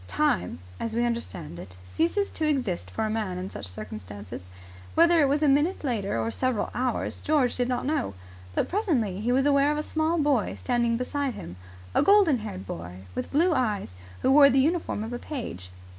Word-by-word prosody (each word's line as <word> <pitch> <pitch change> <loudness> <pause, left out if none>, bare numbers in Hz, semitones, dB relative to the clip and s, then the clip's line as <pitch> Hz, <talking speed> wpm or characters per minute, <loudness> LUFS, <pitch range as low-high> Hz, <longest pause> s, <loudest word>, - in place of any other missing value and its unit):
Time, 90 -1 0 0.2
as 225 -1 -3
we 240 +1 +2
understand 185 - -4
it, 90 +1 -11
ceases 340 - 0
to 315 - -1
exist 245 - -1
for 220 - -2
a - - -1
man 210 -5 -2
in 185 +1 -5
such 100 - -7
circumstances. 100 0 -7 0.5
Whether 335 +1 +6
it 285 - +5
was 290 +3 +1
a - - +4
minute 295 +7 +2
later 215 - -1
or 115 0 -1
several 255 - -1
hours, 250 -2 -1
George 285 -5 +2
did 245 -1 0
not 250 0 -1
know; 270 - -1 0.4
but - - +1
presently 275 - 0
he 240 +3 0
was 265 +2 +3
aware 285 0 +4
of 300 - -1
a 300 - -1
small 315 +2 0
boy 285 -7 +1
standing 240 -2 +1
beside 270 +1 -2
him 85 - -8 0.4
a - - +4
golden 395 - +5
haired 100 - -6
boy 90 +1 -7
with 125 - -4
blue 335 +4 +3
eyes, 215 - -1 0.3
who 260 - +4
wore 280 0 +8
the 270 - +2
uniform 315 -6 0
of 225 +2 -5
a 240 - -3
page. 225 - -6
245 Hz, 200 wpm, -27 LUFS, 185-295 Hz, 0.5 s, wore